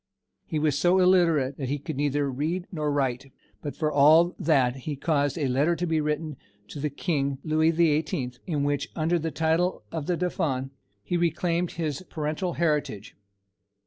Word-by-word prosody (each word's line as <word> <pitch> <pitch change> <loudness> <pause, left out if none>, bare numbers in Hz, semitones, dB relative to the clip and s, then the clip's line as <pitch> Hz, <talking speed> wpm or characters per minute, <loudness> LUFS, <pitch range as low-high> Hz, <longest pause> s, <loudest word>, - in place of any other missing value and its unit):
He 155 - -2
was 150 -2 +1
so 175 +6 +3
illiterate 165 -7 +3
that 135 -3 -4
he 145 - 0
could 150 +2 -6
neither 145 0 0
read 155 +7 -2
nor 150 -4 -1
write; 135 -1 -1 0.3
but 145 - -5
for 155 -1 -1
all 155 +5 +5
that 135 -6 +2
he 145 +3 -5
caused 145 -1 0
a 145 -4 0
letter 140 +7 +2
to 175 - -2
be 160 -2 +1
written 150 -1 -2 0.3
to 145 - -7
the 150 +1 -1
King, 140 -2 -1
Louis 155 +1 +2
the 165 -1 +3
Eighteenth, 145 -5 -2
in 150 -5 -1
which, 145 -1 -1
under 170 +2 +1
the 160 +1 -2
title 160 +3 0
of 160 -3 -4
the 175 - 0
Dauphin, 135 -7 -1 0.3
he 175 - -1
reclaimed 170 +1 0
his 155 -3 -3
paternal 155 +3 -2
heritage. 150 - -1
155 Hz, 175 wpm, -26 LUFS, 140-170 Hz, 0.3 s, all